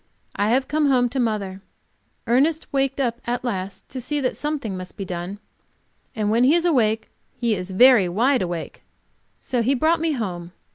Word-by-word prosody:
I 205 +1 +1
have 260 +3 +2
come 300 0 +1
home 250 -3 +3
to 265 +2 -3
mother. 205 -5 -2 0.6
Ernest 295 +7 +2
waked 270 0 0
up 240 -3 -1
at 245 +1 -2
last 195 -5 -3
to 260 - -5
see 295 +4 -1
that 255 -3 -1
something 290 -9 -3
must 185 0 -8
be 195 - -4
done, 180 +2 -5 0.8
and 210 -2 0
when 230 +2 +3
he 280 +6 +5
is 345 0 +1
awake 225 -9 +1 0.3
he 235 -2 +1
is 180 -2 -3
very 210 -1 +6
wide 245 +8 +2
awake. 175 -3 -5 0.6
So 245 -2 -1
he 260 +5 +2
brought 320 +5 +2
me 325 -1 0
home. 180 -8 -5
240 Hz, 185 wpm, -22 LUFS, 195-270 Hz, 0.8 s, very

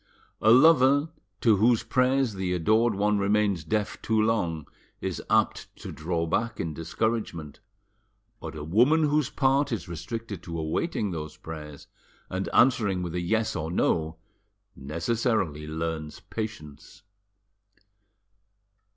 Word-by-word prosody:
A 110 - +4
lover 140 +3 +6 0.3
to 110 -4 +4
whose 115 +3 +3
prayers 130 -2 +1
the 95 -2 -2
adored 110 +6 +2
one 105 +1 +1
remains 100 -3 +1
deaf 105 +5 -2
too 110 -1 +1
long 90 -9 0 0.3
is - - -4
apt - - +1
to - - -8
draw 85 +1 -2
back 115 +7 -1
in 80 -2 -3
discouragement, 85 -3 -3 0.8
but 80 0 -7
a 75 - -6
woman 125 - +3
whose 150 -2 +2
part 135 +1 +1
is 110 -7 -3
restricted 100 +4 -6
to 85 -1 -6
awaiting 95 - -2
those 80 -3 -6
prayers, 75 -3 -9 0.5
and 95 +1 -2
answering 100 -8 +3
with 85 -2 -5
a 90 - -1
yes 110 +5 0
or 80 - -3
no, 80 -2 0 0.6
necessarily 85 - -1
learns 80 -1 -4
patience. 80 -10 -8
100 Hz, 125 wpm, -27 LUFS, 80-115 Hz, 0.8 s, lover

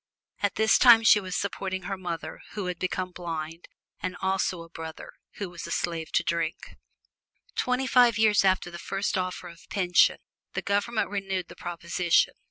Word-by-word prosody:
At 205 -1 0
this 220 +1 +4
time 235 -3 +8
she 215 - +7
was 185 -2 -5
supporting 190 -2 -3
her 195 +2 -3
mother, 175 -3 -6
who 205 -2 -4
had 180 -1 -4
become 185 0 -2
blind, 165 -2 -6 0.3
and 185 -1 -4
also 190 -2 -1
a 165 - -15
brother, 160 -1 -8 0.2
who 200 - -5
was 175 -1 -8
a - - -7
slave 165 -2 -2
to - - +3
drink. 165 -1 -3 0.8
Twenty 250 +1 0
five 245 -3 +5
years 215 -2 +4
after 185 -2 +2
the 170 - -8
first 195 +4 -2
offer 185 -1 -3
of 170 -1 -14
pension, 180 -3 +3 0.4
the - - -3
Government 205 +3 0
renewed 195 -3 -3
the - - -11
proposition. 170 0 +1
185 Hz, 175 wpm, -27 LUFS, 175-200 Hz, 0.8 s, time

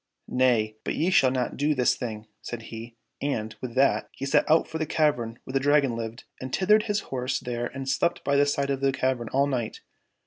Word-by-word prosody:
— - - -57
" - - -53 0.2
Nay, 110 -4 +2
but - - -2
ye 170 +4 +1
shall 135 -8 +5
not 125 -1 -2
do 150 +2 +1
this 125 -2 +3
thing," 110 -3 -5 0.2
said 120 -2 -6
he, 115 +1 -8 0.2
and, 110 -6 -2
with 125 -2 -6
that, 135 +1 +3
he 135 - -5
set 140 - +2
out 160 +1 +4
for 160 - -5
the 155 - -1
cavern 125 -8 +1
where 130 - -8
the 135 - +3
Dragon 140 -3 +3
lived, 115 +1 -5 0.2
and 130 0 -5
tethered 210 - +3
his 210 +1 +1
horse 130 0 -1
there 120 -2 -3
and 135 0 -7
slept 170 +6 0
by 140 - +1
the 145 0 +4
side 140 -1 0
of 135 -1 -2
the 135 0 +3
cavern 130 -3 -1
all 140 +1 +2
night. 125 -5 -3
130 Hz, 235 wpm, -26 LUFS, 120-145 Hz, 0.2 s, shall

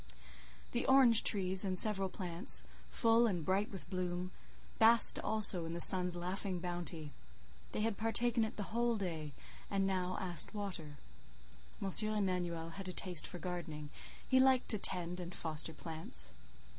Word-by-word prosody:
The 240 - -2
orange 260 -4 +5
trees, 190 -2 +2
and 185 -2 -3
several 195 -1 +1
plants, 180 -2 0 0.3
full 230 0 +2
and 175 -7 -3
bright 195 +3 -1
with 190 -3 -8
bloom, 180 0 -4 0.5
basked 230 +1 +7
also 205 -5 +3
in 165 - -6
the - - -5
sun's 180 0 +6
laughing 185 +2 -3
bounty; 175 -3 -6 0.6
they - - -4
had 220 -1 -2
partaken 230 +1 +1
it 220 - -5
the 205 0 -7
whole 235 0 0
day, 165 -6 -5 0.4
and 195 -1 -1
now 185 -1 -2
asked 180 +3 0
water. 180 -8 -7 0.8
M. 195 - -4 0.3
Emanuel 175 -5 -3
had 195 +3 -9
a 185 - -6
taste 180 -4 +2
for 180 - -6
gardening; 160 -4 -7 0.4
he 260 - +3
liked 260 -1 +2
to 215 - +2
tend 180 -2 -3
and 175 0 -8
foster 160 0 0
plants. 160 - -5
185 Hz, 155 wpm, -34 LUFS, 175-210 Hz, 0.8 s, basked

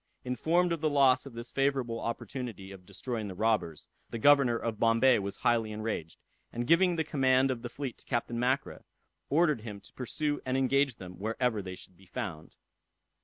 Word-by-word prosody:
Informed 165 +8 +1
of 165 -2 -1
the 155 - +2
loss 140 -2 +4
of 135 - -10
this 115 +1 -7
favorable 135 -4 0
opportunity 115 -5 -5
of 95 -2 -12
destroying 110 +2 -4
the 95 - -7
robbers, 105 -7 0 0.2
the - - -4
governor 135 -1 +5
of 115 -2 -4
Bombay 115 +2 +4
was 100 0 -4
highly 115 -2 +1
enraged, 105 -7 -4 0.3
and 120 +1 -3
giving 175 +5 +4
the 160 - 0
command 130 -3 +3
of 120 -2 -4
the 120 - -5
fleet 135 -2 -6
to - - -16
Captain 120 -1 -2
Mackra, 130 +3 -1 0.5
ordered 150 -5 +3
him 105 -3 -7
to - - -19
pursue 145 +4 -2
and 130 0 -1
engage 135 0 +2
them 90 -3 -10
wherever 115 +1 0
they 95 -1 -7
should 90 - -14
be 95 0 -19
found. 85 -3 -6
120 Hz, 185 wpm, -30 LUFS, 110-135 Hz, 0.5 s, governor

